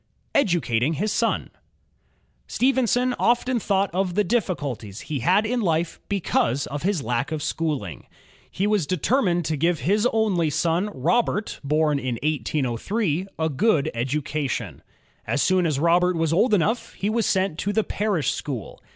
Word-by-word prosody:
Educating 160 - +2
his 205 +7 -1
Son - - 0 1.0
Stephenson 250 -1 +2
often 245 +1 +2
thought 195 -3 0
of 185 -1 -1
the 210 - +2
diflSiculties 145 - -2
he 150 -3 -4
had 185 - +3
in 245 +2 0
life 165 -3 0
because 145 - 0
of 145 +1 -5
his 185 -5 0
lack 120 +4 -1
of 155 -2 -3
schooling. 145 - -3 0.4
He 190 - -2
was 205 -7 +1
determined 180 - +1
to 155 - 0
give 165 +2 +1
his 210 +6 +2
only 200 -8 +1
son 165 +6 0
Robert, 210 - 0
born 150 0 +1
in 130 -2 -2
1803, 155 - -1
a 160 0 0
good 160 - +1
education. 140 +3 -3 0.5
As 140 - +1
soon 185 -2 +3
as 150 -4 0
Robert 175 +4 +3
was 165 -1 0
old 215 +5 +4
enough 210 +6 0
he 200 - -3
was 230 0 +1
sent 190 -4 0
to 205 - -1
the 220 +1 +1
parish 195 - 0
school. 130 -8 -6
170 Hz, 150 wpm, -24 LUFS, 145-205 Hz, 1.0 s, old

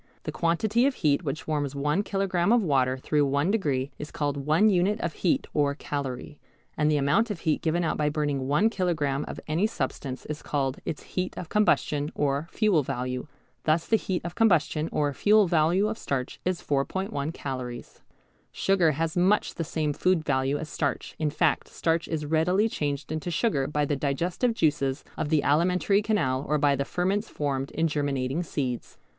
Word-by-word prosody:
The - - -4
quantity 215 +9 +2
of 280 - -1
heat 150 +1 +1
which 150 0 -4
warms 145 -3 -1
one 150 +6 +1
kilogram 195 -2 0
of 240 -2 +4
water 130 -5 +2
through 145 +3 +1
one 140 +6 +1
degree 145 -10 0
is 150 - -6
called 145 -1 -2
one 155 +9 +3
unit 200 +2 +2
of 170 -5 -2
heat 175 - +1
or 145 -2 +1
calorie, 140 -1 -5 0.4
and 150 -1 +2
the 150 - +3
amount 145 +12 +2
of 205 -5 -4
heat 155 -3 0
given 170 +2 0
out 160 - 0
by 150 -1 +1
burning 145 -3 -1
one 150 +11 +3
kilogram 155 -8 0
of - - -6
any 165 +7 +1
substance 135 - -4
is 150 -1 -5
called 135 -2 -2
its 155 - -4
heat 185 0 -4
of 170 - -6
combustion 150 -8 +1
or 145 +2 0
fuel 210 -8 +2
value. 125 0 -3 0.4
Thus 160 +2 +2
the 225 - +3
heat 190 -5 -2
of 175 - -4
combustion 165 -7 +2
or 145 -1 0
fuel 210 +7 +4
value 170 +4 +3
of 220 +1 -4
starch 130 -2 -3
is 185 -1 -2
4·1 145 +1 -1
calories. 130 -5 -6 0.5
Sugar 180 -5 +2
has 160 +2 -2
much 185 +4 +2
the 165 - -3
same 155 -2 -1
food 180 0 +1
value 135 +2 +1
as 155 - -5
starch, 145 -3 -2
in 155 -1 +1
fact 145 - +1
starch 165 0 -1
is 155 -2 -3
readily 170 +7 +2
changed 145 -7 -3
into 155 +2 -3
sugar 160 - +1
by 150 0 0
the 145 - 0
digestive 170 - 0
juices 145 -7 +1
of 145 - -2
the 155 -2 +2
alimentary 180 +7 +3
canal 140 -12 0
or 150 - +3
by 145 -1 +3
the 140 +1 -2
ferments 195 +7 -1
formed 140 -2 -2
in 165 +2 0
germinating 140 -1 -1
seeds. 130 -7 -4
155 Hz, 185 wpm, -27 LUFS, 140-180 Hz, 0.5 s, of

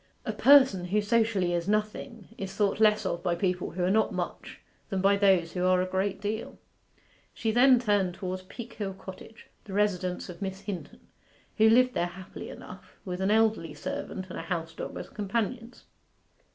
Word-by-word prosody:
A - - -2
person 260 -10 +6
who 200 +4 +1
socially 205 -4 +1
is 170 0 -1
nothing 215 +1 -2
is 195 -2 -6
thought 205 0 +1
less 215 -1 +4
of 170 - -2
by 175 -2 0
people 180 0 -1
who 180 +1 -3
are 180 - +2
not 220 +2 +2
much - - -5 0.3
than 195 -3 -1
by 195 +1 +4
those 190 -4 +3
who 180 - -2
are 185 0 +4
a 185 - +1
great 190 +1 -1
deal. 210 +2 -4 0.8
She 225 - -1
then 250 +3 +6
turned 205 -6 +1
towards 185 -1 -4
Peakhill 210 -1 -7
Cottage, 190 +3 -11 0.2
the 200 - -8
residence 185 -3 0
of 180 +2 -10
Miss 190 0 -4
Hinton, 195 -5 -7 0.6
who 220 0 +7
lived 250 +2 +5
there 175 - 0
happily 185 +1 -9
enough, - - -12
with 180 -1 -4
an 190 - +1
elderly 215 -8 +2
servant 185 +5 -5
and - - -5
a - - -3
house 165 -3 -4
dog - - -6
as - - -6
companions. 230 +4 -3
195 Hz, 180 wpm, -28 LUFS, 185-220 Hz, 0.8 s, who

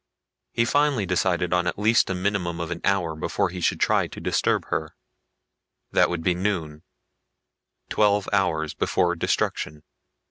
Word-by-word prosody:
He 115 - +1
finally 145 -4 +2
decided 90 -1 0
on 90 0 +1
at 90 - -2
least 110 +2 +3
a 95 - -1
minimum 90 -2 -1
of 85 0 -4
an 85 - -4
hour 90 -5 +1
before 80 - -1
he 90 +1 -7
should - - +1
try - - +2
to - - -10
disturb - - 0
her. 80 0 -3 1.0
That - - +4
would 85 -2 -3
be 90 - +2
noon 85 -5 -2 1.1
twelve 105 -1 +2
hours 80 -6 +1
before 90 -2 +1
destruction. 75 -2 -2
90 Hz, 150 wpm, -24 LUFS, 85-100 Hz, 1.1 s, That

